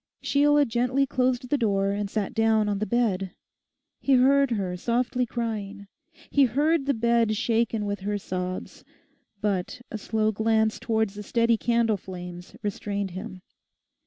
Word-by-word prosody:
Sheila 290 +1 +4
gently 250 +3 +1
closed 255 -1 0
the 290 - +2
door 200 -3 +1
and 205 0 -2
sat 205 -2 -2
down 220 -1 +2
on 205 -1 -1
the 215 - -2
bed. 200 -6 0 0.6
He 275 - +2
heard 275 +2 +4
her 195 -6 -2
softly 245 +5 0
crying, 215 -4 -4 0.5
he 280 -1 +5
heard 290 +4 +1
the 280 - +2
bed 230 -1 +2
shaken 230 -2 0
with 205 -1 -2
her 205 +2 -2
sobs. 185 -1 -5 0.6
But 205 +3 -2
a 220 - -4
slow 215 +1 0
glance 220 0 +1
towards 220 -3 0
the 210 - -7
steady 230 +2 +2
candle 230 -1 +1
flames 180 -1 -9
restrained 200 -1 -3
him. 185 0 -8
220 Hz, 150 wpm, -26 LUFS, 200-245 Hz, 0.6 s, he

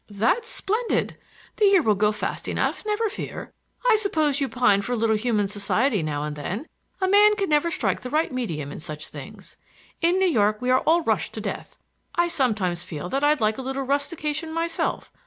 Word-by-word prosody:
"That's 225 - 0
splendid. 440 +3 0 0.4
The 425 - +4
year 390 -4 +5
will 215 - +4
go 210 +1 +2
fast 210 - -4
enough, - - -1
never 425 +2 +1
fear. 405 - -7 0.3
I 455 -3 +6
suppose 310 -9 +1
you 275 - 0
pine 245 -6 +3
for 245 +5 -3
a - - +1
little 225 -1 +2
human 215 -2 +1
society 205 +3 +1
now 150 -2 -2
and 150 0 -4
then. 185 - -4 0.3
A 375 - +1
man 415 +2 +6
can 395 -4 -1
never 300 +2 +3
strike 360 +1 -1
the 250 - -6
right 310 +1 0
medium 160 - -3
in - - -7
such 155 0 -6
things. - - -11 0.4
In 340 +2 +3
New 380 - +3
York 215 - +2
we 250 0 0
are 255 - +5
all 335 +2 +4
rushed - - 0
to - - -4
death. - - -6 0.4
I 345 0 +2
sometimes 215 - 0
feel 165 +1 -6
that 275 +6 -1
I'd 295 -2 +3
like 215 +2 +1
a - - -2
little 270 +1 -3
rustication 300 +3 -2
myself. 330 +1 -2
265 Hz, 205 wpm, -24 LUFS, 210-335 Hz, 0.4 s, I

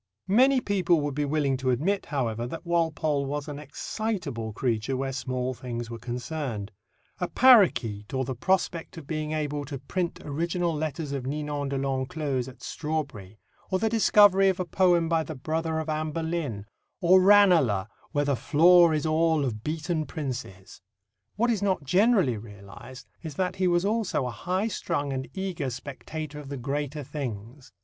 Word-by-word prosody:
Many 260 +3 +5
people 180 -6 +2
would 145 -1 -2
be 145 +1 -1
willing 140 -2 +1
to 130 0 -1
admit, 170 +11 0
however, 120 -5 -2
that 165 +7 -7
Walpole 160 -4 +1
was 145 +1 -3
an 145 -1 -6
excitable 150 - -4
creature 120 +3 -1
where 135 0 -2
small 130 0 -2
things 120 -2 -6
were 115 - -6
concerned 125 -3 -4 0.5
a 180 - -1
parroquet 175 - +5
or 130 -1 -1
the 130 - -3
prospect 170 +4 -1
of 160 - -8
being 155 0 -3
able 150 -1 -2
to 140 0 -5
print 170 +6 -3
original 170 +3 -1
letters 155 -1 -3
of 135 -2 -3
Ninon 145 0 -3
de 140 - -2
l'Enclos 135 0 -2
at 130 -1 -12
Strawberry, 140 - -4 0.3
or 185 - +1
the 220 +3 +1
discovery 205 -3 +5
of 185 - -1
a 185 - -1
poem 175 -2 +3
by 165 -1 +2
the 160 0 -6
brother 160 +4 -2
of 160 0 -3
Anne 155 0 -1
Boleyn, 160 -11 -3 0.3
or 185 +1 +6
Ranelagh, 180 - +5 0.3
where 145 0 +1
"the 140 -1 +1
floor 170 +4 +5
is 150 - -1
all 160 -1 +2
of 110 -4 -4
beaten 155 0 -2
princes." 130 - -6 0.5
What 235 +4 +2
is 215 -4 -1
not 190 -6 0
generally 185 - +3
realized 105 +4 -11 0.2
is 160 -4 -7
that 185 +1 -1
he 185 -1 +2
was 175 +1 +2
also 205 - 0
a 125 - -3
high 185 - -1
strung 145 -9 -2
and 130 0 -3
eager 185 -8 -3
spectator 145 +4 -7
of 145 -2 -9
the 140 - -4
greater 145 +3 -3
things. 125 -2 -7
150 Hz, 170 wpm, -27 LUFS, 130-175 Hz, 0.5 s, or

